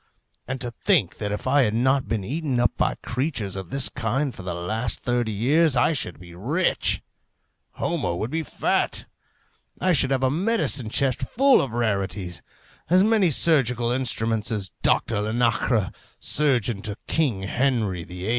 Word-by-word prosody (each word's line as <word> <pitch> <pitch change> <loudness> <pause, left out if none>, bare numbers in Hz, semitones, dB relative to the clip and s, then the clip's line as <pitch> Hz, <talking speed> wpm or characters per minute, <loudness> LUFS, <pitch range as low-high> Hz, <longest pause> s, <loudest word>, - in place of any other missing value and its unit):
And 130 +1 -3
to 120 -2 -3
think 130 - +1
that 105 -1 -2
if 105 - -4
I 140 +2 +4
had 110 -4 +1
not 130 +3 +2
been 110 -4 -2
eaten 135 - -2
up 120 - +3
by - - 0
creatures 120 - -2
of 95 -3 -6
this 135 +3 +2
kind 130 +3 -2
for - - -10
the 90 -2 -4
last 110 +6 -2
thirty 120 -2 0
years, 140 +8 +2
I 130 - +3
should 110 - -3
be 85 -2 -12
rich; 140 - 0 0.7
Homo 85 - -2
would 110 +8 -3
be 165 - -1
fat; 155 - -1 0.7
I 185 - +2
should 130 -4 +3
have 135 -1 0
a 130 - +3
medicine 170 - 0
chest 130 +2 +1
full 265 - +4
of 130 -5 -4
rarities; 100 -6 -2 0.5
as 185 +2 +5
many 215 -4 +3
surgical 125 -6 +3
instruments 115 -4 0
as 100 -4 -3
Doctor 100 - +1
Linacre, 115 -1 +1 0.3
surgeon 125 -8 +1
to 105 -1 -5
King 130 -12 0
Henry 110 -5 0
VIII. 90 +4 -6
120 Hz, 165 wpm, -24 LUFS, 105-140 Hz, 0.7 s, as